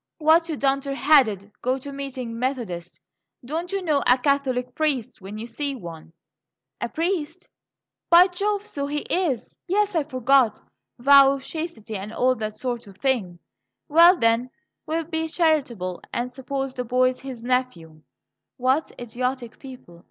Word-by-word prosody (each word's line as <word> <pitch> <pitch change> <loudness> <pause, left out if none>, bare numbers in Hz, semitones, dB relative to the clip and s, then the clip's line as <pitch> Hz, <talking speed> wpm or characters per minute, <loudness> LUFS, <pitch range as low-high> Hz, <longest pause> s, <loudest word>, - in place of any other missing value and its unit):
"Why, 315 +1 +5
you 325 -3 -4
dunder 275 0 0
headed, 225 -10 +3
go 255 +2 0
to 280 +2 -8
meeting 255 -4 -6
Methodist! 225 -10 -4 0.5
Don't 330 +7 -4
you 390 -1 -2
know 300 -5 +1
a 250 +1 +6
Catholic 255 -2 0
priest 280 -10 -1
when 195 +3 -8
you 220 - -6
see 275 +4 -3
one?" 165 -7 -10 0.7
"A - - -2
priest? 330 0 -2 0.6
By 345 +1 +8
Jove, 400 +3 -2
so 285 -9 -4
he 295 +1 -2
is! 330 -10 -2
Yes, 410 +2 +1
I 325 -3 +1
forgot; 255 -4 +2 0.4
vow 275 +2 +7
of 275 -1 -6
chastity, 310 -11 -6
and 200 +2 -5
all 255 +3 +2
that 215 -1 -4
sort 240 0 -4
of 195 -1 -14
thing. 220 -10 -1 0.5
Well 340 +4 +7
then, 230 0 +2 0.4
we'll 325 +1 -1
be 320 0 -3
charitable 270 - 0
and 245 +1 -2
suppose 270 +1 -4
the 250 - -3
boy's 255 +1 +1
his 260 -4 -8
nephew." 240 -12 -2 0.6
"What 260 +4 +1
idiotic 245 0 -4
people!" 250 -11 -12
265 Hz, 150 wpm, -24 LUFS, 235-305 Hz, 0.7 s, By